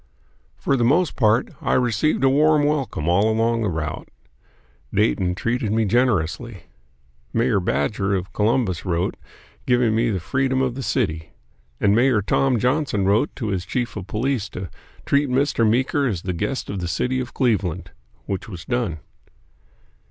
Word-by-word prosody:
For 140 - 0
the 120 - +1
most 150 +7 +2
part 115 0 +2
I - - 0
received 125 +4 +1
a 135 - +5
warm 150 +2 +4
welcome 135 - -1
all 100 +5 +3
along 115 +1 +1
the 105 - 0
route. 80 -2 -4 0.8
Dayton 90 +9 +1
treated 115 +1 -1
me 110 0 +2
generously. 110 -2 0 0.7
Mayor 115 -2 +2
Badger 95 +4 0
of 95 0 -4
Columbus 105 -4 0
wrote 90 -1 -1 0.5
giving 125 -3 +3
me 115 +1 +2
the 100 -4 -1
freedom 130 +7 0
of 130 -2 0
the 135 - -6
city; 80 - -2 0.5
and 100 - +3
Mayor 120 -3 +3
Tom 130 +5 +2
Johnson 125 -4 0
wrote 105 +8 +2
to 110 -5 -3
his 95 -3 -1
chief 120 +7 -3
of 95 -3 -6
police 115 +1 -1
to 90 -2 -7 0.3
"treat 140 0 +2
Mr. 125 -3 +2
Meeker 130 +4 +1
as 95 -8 -3
the 90 - -2
guest 130 +10 -3
of 100 - -4
the 90 - -3
city 125 +9 -1
of 125 -1 -6
Cleveland," 95 - 0 0.3
which 95 +2 -4
was 90 -5 -8
done. 115 -11 -2
115 Hz, 160 wpm, -22 LUFS, 95-130 Hz, 0.8 s, a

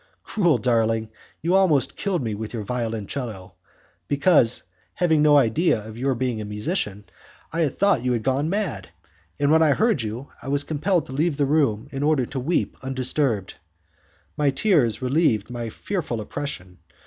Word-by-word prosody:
Cruel 175 - +2
darling, 115 -2 +1 0.3
you 170 +2 +1
almost 155 -9 +3
killed 190 -8 -1
me 110 -2 -2
with 110 +3 -6
your 110 - -3
violoncello, 110 -3 -4 0.5
because, 140 -5 +4 0.3
having 160 -4 +2
no 150 -1 +6
idea 135 +2 +3
of 110 0 -9
your 130 +2 0
being 120 -2 -2
a - - -4
musician, 105 - -3 0.5
I 165 -3 +1
thought 190 -4 +1
you 125 - +1
had 115 -2 -2
gone 135 +4 0
mad, 175 - -3 0.5
and 145 0 +2
when 160 +1 +5
I 155 -3 +5
heard 220 - +2
you 115 +5 -5
I - - -10
was 140 +1 +2
compelled 160 +3 0
to 130 - -9
leave 150 +1 0
the 145 - +2
room 135 -6 +1
in 135 - -4
order 145 -3 +2
to 135 +2 -5
weep 155 +8 -1
undisturbed. 130 -5 -1 0.8
My 145 -1 +2
tears 135 - +1
relieved 125 -6 +1
my 120 -2 -4
fearful 155 - -4
oppression. 105 -7 -6
135 Hz, 165 wpm, -23 LUFS, 115-155 Hz, 0.8 s, no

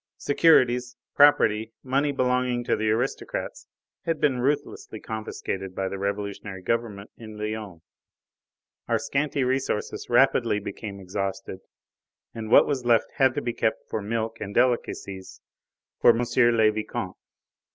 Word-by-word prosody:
Securities, 125 -5 +3 0.2
property, 115 -7 +4
money 140 +3 +1
belonging 125 -2 0
to - - 0
aristocrats 130 - -2 0.4
had 165 -2 -1
been 135 -4 +2
ruthlessly 140 -4 -2
confiscated 95 -4 -5
by 95 - -1
the 100 0 -5
revolutionary 100 -1 -4
government 110 -2 -2
in 110 -2 -10
Lyons. 105 -5 -5 1.0
Our - - +2
scanty 140 -1 -1
resources 130 -4 -2
rapidly - - +3
became 100 0 -7
exhausted, 95 0 -4 0.7
and 110 -1 -6
what - - +7
was 140 -4 -2
left 120 -2 +2
had 130 -2 +3
to 145 - -2
be 120 - -2
kept 110 - -1
for 110 - -2
milk 110 +2 -3
and 100 - -6
delicacies 115 -6 -1 0.6
for - - +6
M. 120 - 0 0.3
le 110 -2 +4
Vicomte. 110 0 -5
115 Hz, 130 wpm, -25 LUFS, 105-130 Hz, 1.0 s, what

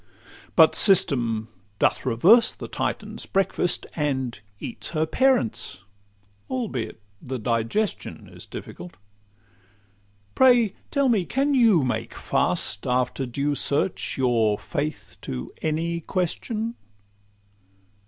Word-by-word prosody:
But - - +7
System 120 - +3 0.3
doth - - +1
reverse 195 - +5
the - - -8
Titan's - - -3
breakfast, 190 -2 0
And 130 -7 -2 0.2
eats - - -4
her 155 - +2
parents, 255 - +1 0.7
albeit 210 - -4 0.2
the 130 0 -5
digestion 115 - -2
Is - - -12
difficult. 90 0 -9 1.4
Pray 245 -6 +4 0.2
tell 280 -2 +1
me, 220 -7 +2
can 275 +9 0
you 225 - +4
make 115 -2 -3
fast, 100 - +1
After 125 +1 0
due 140 +4 -1
search, 145 +5 +1
your 115 -5 +2
faith 145 -9 -5
to 65 0 -6
any 165 +2 -1
question? 215 +7 -2
150 Hz, 105 wpm, -24 LUFS, -, 1.4 s, But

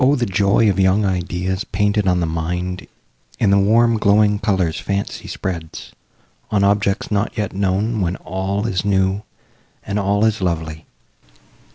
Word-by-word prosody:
the 125 -3 0
joy 100 +2 +2
Of 100 -2 +1
young 95 +2 +3
ideas 95 +1 -2
painted 105 +1 0
on 90 -1 +2
the - - +1
mind 90 +3 -3 0.5
In 105 -4 +2
the 100 - +5
warm 115 +3 +3
glowing 105 0 +3
colours 95 -7 0
fancy 100 0 -3
spreads 85 -4 -6 0.6
On 100 -2 +1
objects 100 +1 +1
not 105 0 -1
yet 105 -3 -2
known, 100 +3 0
when 90 0 -1
all 95 +3 -3
is 95 -6 -1
new, 95 0 +1 0.6
And 100 - -2
all 100 +2 +1
is 110 -1 0
lovely! 80 -3 -3
100 Hz, 150 wpm, -19 LUFS, 90-105 Hz, 0.6 s, the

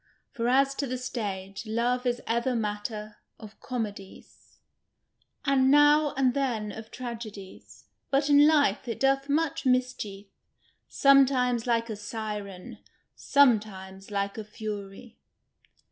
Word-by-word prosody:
For 235 -3 -2
as 270 +2 +3
to 280 - -2
the 255 +1 -3
stage, 200 -5 -5
love 245 +3 0
is 245 0 -1
ever 235 +2 0
matter 210 -1 -4 0.2
of 215 -2 -13
comedies, 210 -6 -7 0.9
and 265 -2 +3
now 295 +1 +5
and 260 -2 +3
then 235 -7 -2
of 220 +1 -9
tragedies; 225 -6 -9 0.2
but 280 +1 +1
in 290 0 +6
life, 285 -8 +2
it 230 - -4
doth 275 +1 +1
much 320 +2 0
mischief; 250 -6 -1 0.6
sometimes 255 -4 +3
like 230 -1 +1
a 220 - -5
siren; 210 -3 -7 0.4
sometimes 205 -8 +1
like 200 +1 -2
a - - -5
fury." 210 0 -8
235 Hz, 120 wpm, -27 LUFS, 210-270 Hz, 0.9 s, in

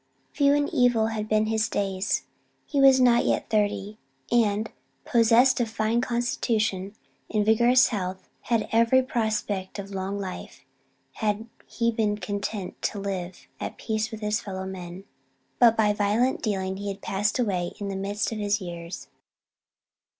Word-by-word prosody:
Few 280 -1 +3
and 290 0 +1
evil 240 -3 +3
had 215 -1 -4
been 215 0 +3
his 220 0 0
days; 195 -1 -1 0.4
he 285 -2 0
was 270 -1 +7
not 245 -2 +5
yet - - -1
thirty, 210 0 0 0.3
and, 220 -2 +2 0.3
possessed 240 +3 +4
of 235 - 0
a - - -10
fine 220 +2 +1
constitution 220 -5 -1 0.4
and 210 -2 +1
vigorous 240 +3 +5
health, 190 -4 -4 0.2
had 230 -2 +1
every 230 +3 +4
prospect 215 -6 -2
of 200 0 -7
long 195 +1 -3
life 190 -2 -7 0.5
had 215 0 -2 0.2
he 235 0 0
been 215 -2 0
content 205 -1 -4
to 210 - -2
live 185 -2 -5
at - - -5
peace 220 -1 -2
with 220 -1 -8
his 210 0 0
fellow 190 -2 -5
men; 185 -1 -7 0.6
but 230 -2 +6
by 210 -2 +3
violent 215 +7 +1
dealing 190 -5 -2
he 205 +1 -5
had 195 0 -5
passed 205 +2 0
away 190 -8 -1
in 200 -1 -4
the 195 - -4
midst 200 +3 -2
of 220 - -4
his 205 0 +1
years. 170 -2 -7
215 Hz, 155 wpm, -26 LUFS, 195-230 Hz, 0.6 s, was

